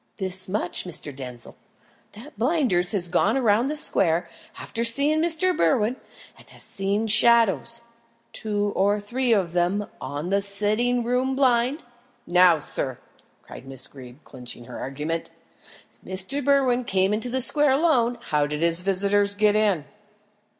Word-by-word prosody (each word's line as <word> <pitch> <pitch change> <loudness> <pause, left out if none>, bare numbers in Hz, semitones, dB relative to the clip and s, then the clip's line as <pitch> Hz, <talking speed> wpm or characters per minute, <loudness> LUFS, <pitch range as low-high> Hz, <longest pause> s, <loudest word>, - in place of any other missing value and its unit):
"This 185 -1 +3
much, 200 -2 -1
Mr. 155 -5 +1
Denzil, 125 -3 -8 0.6
that 240 +9 -13
Blinders 225 - +1
has 190 -5 -1
gone 180 +9 +1
round 235 +1 +1
the 305 - -3
square, 175 - +1 0.3
after 230 - -4
seeing 280 +7 +3
Mr. 345 +2 +3
Berwin, 210 +8 +1 0.4
and - - -19
has - - -9
seen 200 +3 -2
shadows 230 +1 +3 0.5
two 205 -2 -2
or 205 +2 +1
three 245 +4 -2
of 190 -6 +1
them 180 +4 0 0.2
on 145 +5 -5
the 200 +1 +1
sitting 210 +5 0
room 250 +2 -1
blind. 260 +2 +1 0.4
Now, 180 -1 +4
sir," 135 -3 -2 0.5
cried 135 - -13
Miss 135 -1 -2
Greeb, 130 +1 -14
clinching 125 -1 -8
her 125 - -9
argument, 150 +5 -5 0.7
"if 185 0 -6
Mr. 280 +4 -3
Berwin 260 -3 +2
came 190 -3 0
into 225 +4 -2
the 260 +2 -1
square 295 +3 +4
alone, 265 -5 +1
how 150 -1 -1
did 150 +2 -4
his 170 +1 +2
visitors 200 +2 +1
get 210 0 +2
in?" 205 -8 +1
205 Hz, 150 wpm, -23 LUFS, 175-245 Hz, 0.7 s, Now